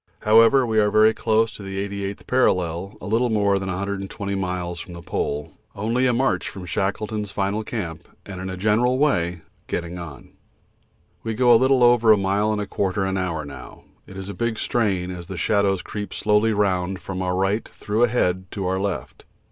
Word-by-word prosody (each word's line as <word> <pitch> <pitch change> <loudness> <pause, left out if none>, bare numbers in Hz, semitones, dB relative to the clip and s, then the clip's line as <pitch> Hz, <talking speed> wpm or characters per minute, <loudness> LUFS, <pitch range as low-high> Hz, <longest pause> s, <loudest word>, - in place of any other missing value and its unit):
However, 115 +4 +6
we 110 -2 +1
are 105 -1 +3
very 110 +1 +5
close 110 0 +1
to 110 - -10
the 95 0 -6
88th 100 0 -5
parallel, 90 -6 0
little 115 +4 +1
more 100 -3 +2
than 95 0 -4
120 100 +1 -3
miles 90 -3 -3
from 90 - -8
the 85 0 -9
Pole, 75 -3 -3 0.2
only 115 +5 +1
a - - +3
march 130 +3 0
from 95 -2 -9
Shackleton's 105 +3 -2
final 100 +1 -1
camp, 90 -7 -5 0.2
and 95 -2 -7
in 95 - -4
a 95 - -5
general 110 +6 +2
way 90 - +1 0.3
'getting 85 +1 -4
on.' 75 -6 -9 0.9
We 115 -1 -3
go 120 0 +5
little 130 +2 +4
over 120 -2 +6
a 105 - +6
mile 100 +2 +1
and 105 - -1
a 105 - -2
quarter 95 0 -1
an 95 0 -1
hour 85 -5 -2
now 70 -1 -11 0.2
it 95 - -11
is 95 0 -6
a 100 - -5
big 115 0 -2
strain 95 -6 0
as 85 -2 -8
the 95 - -6
shadows 100 +1 +1
creep 105 -3 -6
slowly 105 +2 +2
round 95 -3 0
from 95 -1 -5
our 90 0 -1
right 95 +4 0
through 105 +2 -3
ahead 95 -7 +2
to 100 -2 -3
our 95 +1 0
left. 95 -9 -4
100 Hz, 190 wpm, -23 LUFS, 90-110 Hz, 0.9 s, However